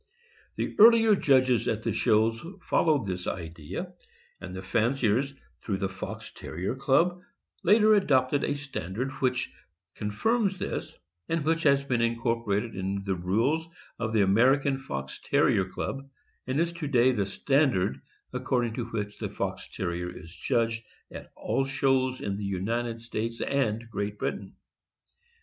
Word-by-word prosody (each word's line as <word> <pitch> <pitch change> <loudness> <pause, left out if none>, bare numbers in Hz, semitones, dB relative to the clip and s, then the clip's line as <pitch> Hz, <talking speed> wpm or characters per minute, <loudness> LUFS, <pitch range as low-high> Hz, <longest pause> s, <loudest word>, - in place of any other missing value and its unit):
The - - -3
earlier 225 -1 +8
judges 130 - +3
at 110 0 -1
the - - 0
shows 110 +2 +2 0.2
followed 150 -10 +2
this 90 -2 -4
idea, 80 -3 -5 0.5
and 95 -1 -8
the 95 - -6
fanciers, 120 +5 +1 0.3
through 100 -4 -2
the 95 0 -1
Fox 95 0 -7
Terrier 90 +7 -4
Club, 145 +7 +2 0.4
later 215 0 +5
adopted 140 -8 +3
a 145 - 0
standard 135 - -4
which 125 -3 0 0.4
confirms 195 - 0
this, - - -4 0.4
and 165 -3 0
which 165 +1 +2
has 140 -3 +4
been 125 -4 0
incor 115 0 0
porated 105 +1 -1
in 95 +1 -2
the 100 -1 -1
rules 115 - 0 0.3
of 110 -1 -1
the 110 -2 +4
American 135 +7 +3
Fox 65 - -5
Terrier 95 - +3
Club, 135 +8 -5 0.4
and 130 +3 0
is 170 +1 +1
to 170 -3 -4
day 130 -2 +4
the 105 -6 -1
standard 130 -3 +1 0.3
according 125 -2 0
to 120 -1 -3
which 105 -3 -4
the - - -3
Fox - - -4
Terrier 90 -1 -3
is 85 -1 -11
judged 115 +4 0 0.3
at - - -9
all 135 - 0
shows 135 -1 +1
in 100 -1 -2
the 105 - -5
United 115 +5 -2
States 115 0 -3
and 115 -5 0
Great 105 0 -3
Britain. - - -4
115 Hz, 150 wpm, -28 LUFS, 100-140 Hz, 0.5 s, earlier